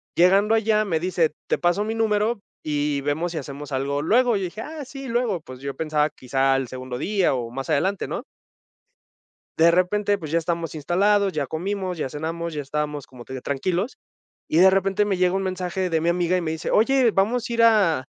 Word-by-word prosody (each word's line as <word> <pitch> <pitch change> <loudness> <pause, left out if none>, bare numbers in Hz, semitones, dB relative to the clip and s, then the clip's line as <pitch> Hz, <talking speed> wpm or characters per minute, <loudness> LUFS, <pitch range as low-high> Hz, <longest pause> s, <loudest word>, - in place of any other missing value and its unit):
Llegando 195 +5 +4
allá 215 -1 +2
me 165 -5 0
dice: 175 -3 +1
"Te - - +1
paso 175 +4 +1
mi 220 +1 -3
número, 220 0 +1 0.3
y 145 -1 0
vemos 155 +5 -1
si 160 - -4
hacemos 140 +1 -8
algo 140 +2 -1
luego", 235 +6 +3
y - - -3
yo - - -2
dije: 200 +5 -6
"Ah, 305 0 -7
sí, 275 0 -8
luego", 230 -7 0
pues, 130 -4 -11
yo 140 0 -5
pensaba 155 -1 0
quizá 135 +1 0
al 135 -1 0
segundo 130 0 -6
día, 195 +3 +1
o, 120 -3 -3
más 135 +4 -6
adelante, 185 +7 0
¿no? - - -4 1.3
De 165 +1 +6
repente, 200 +4 +2
pues, 155 -5 -7
ya 165 - +2
estamos 165 -1 -2
instalados, 195 +6 +2
ya 150 -2 -1
comimos, 185 +3 -3
ya 135 - -2
cenamos, 165 +3 -4
ya 150 - -3
estábamos 150 0 -3
como 125 -2 -13
te 130 - -9
digo 130 - -5
tranquilos, 180 - -2 0.5
y 160 - 0
de 190 +2 +8
repente 195 +2 +2
me 200 - 0
llega 180 0 +2
un 195 0 0
mensaje 185 0 -2
de 160 -1 +1
mi 170 - +1
amiga, 175 +1 +1
y 180 - +1
me 160 - -2
dice: 160 0 -4
"Oye, 255 +1 +4
vamos 225 +5 +1
a - - -3
ir 230 0 +3
a 190 - +4
175 Hz, 215 wpm, -23 LUFS, 150-205 Hz, 1.3 s, de